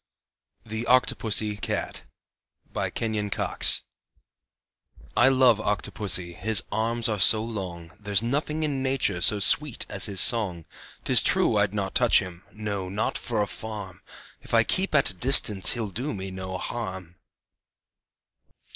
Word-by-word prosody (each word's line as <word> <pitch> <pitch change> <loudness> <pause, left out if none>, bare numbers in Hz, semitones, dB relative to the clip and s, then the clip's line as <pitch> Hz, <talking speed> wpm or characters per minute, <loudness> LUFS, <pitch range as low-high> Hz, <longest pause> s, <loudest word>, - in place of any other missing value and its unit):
THE 110 +1 -6
OCTOPUSSYCAT 110 -4 0 0.7
BY - - -3
KENYON 110 -2 -4
COX - - +2 1.3
I 125 +2 +4
love 130 -4 +3
Octopussy, 100 -4 -2
his 110 +6 +1
arms 115 +2 -1
are 105 -2 -3
so 110 +3 +5
long; 90 -7 -8
There's 100 0 -1
nothing 150 +5 -3
in 140 -3 -3
nature 130 -9 -1
so 105 - +4
sweet 140 +6 +2
as 100 - +2
his 100 -2 -3
song. 95 -9 +2 0.4
'Tis - - +4
true - - +1
I'd 105 - 0
not 95 -2 -4
touch 120 -2 +4
him 90 -3 -3
no, 100 -3 -6
not 105 +4 -3
for 110 -3 -2
a - - -5
farm! 105 -5 -9 0.4
If - - -4
I - - +4
keep 190 -4 -1
at 140 -8 +3
a - - -8
distance 105 -2 +6
he'll 110 -4 -5
do 125 +8 -5
me 95 0 -7
no 95 0 -7
harm. 95 -6 -7
105 Hz, 140 wpm, -24 LUFS, 95-120 Hz, 1.3 s, distance